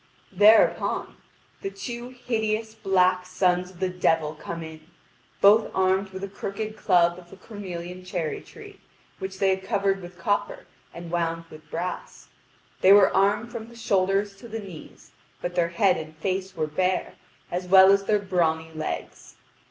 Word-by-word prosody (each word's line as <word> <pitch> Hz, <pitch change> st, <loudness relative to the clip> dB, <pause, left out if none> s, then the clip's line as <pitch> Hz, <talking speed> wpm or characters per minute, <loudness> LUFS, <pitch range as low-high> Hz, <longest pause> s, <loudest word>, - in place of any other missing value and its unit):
Thereupon, 210 Hz, +4 st, +4 dB, 0.5 s
the 195 Hz, -, -3 dB
two 235 Hz, +5 st, -7 dB
hideous, 220 Hz, -3 st, -2 dB
black 185 Hz, -3 st, +2 dB
sons 180 Hz, -1 st, +1 dB
of 180 Hz, -2 st, -16 dB
the 190 Hz, -1 st, 0 dB
devil 165 Hz, -4 st, +1 dB
come 165 Hz, +2 st, -7 dB
in, 160 Hz, 0 st, -10 dB, 0.6 s
both 215 Hz, +3 st, +6 dB
armed 190 Hz, +1 st, +2 dB
with 190 Hz, 0 st, -8 dB
a -, -, -2 dB
crooked 200 Hz, +2 st, -5 dB
club 175 Hz, -4 st, +2 dB
of 175 Hz, -1 st, -17 dB
a -, -, -11 dB
cornelian 185 Hz, -3 st, -8 dB
cherry 175 Hz, -4 st, -3 dB
tree, 410 Hz, -3 st, -14 dB, 0.4 s
which 190 Hz, -1 st, -6 dB
they 195 Hz, 0 st, +2 dB
had 190 Hz, 0 st, -2 dB
covered 195 Hz, -1 st, 0 dB
with 175 Hz, 0 st, -11 dB
copper 355 Hz, -, -2 dB, 0.3 s
and 170 Hz, -1 st, -9 dB
wound 165 Hz, -1 st, -1 dB
with 155 Hz, 0 st, -14 dB
brass. 180 Hz, +2 st, -6 dB, 0.5 s
They 190 Hz, -, +8 dB
were 200 Hz, -1 st, +6 dB
armed 205 Hz, +4 st, +2 dB
from 230 Hz, -2 st, -7 dB
the 235 Hz, -, -15 dB
shoulders 195 Hz, -2 st, 0 dB
to 235 Hz, -, -12 dB
the 225 Hz, 0 st, -5 dB
knees, 190 Hz, -7 st, -11 dB, 0.3 s
but 175 Hz, -, -4 dB
their 175 Hz, -1 st, +1 dB
head 185 Hz, +1 st, +2 dB
and 155 Hz, -1 st, -8 dB
face 190 Hz, +3 st, -3 dB
were 160 Hz, -2 st, 0 dB
bare, 180 Hz, +4 st, -1 dB, 0.4 s
as 180 Hz, +1 st, -3 dB
well 190 Hz, +1 st, +8 dB
as 200 Hz, 0 st, +3 dB
their 210 Hz, -, +3 dB
brawny 165 Hz, -5 st, 0 dB
legs. 155 Hz, 0 st, -6 dB
190 Hz, 165 wpm, -25 LUFS, 175-205 Hz, 0.6 s, They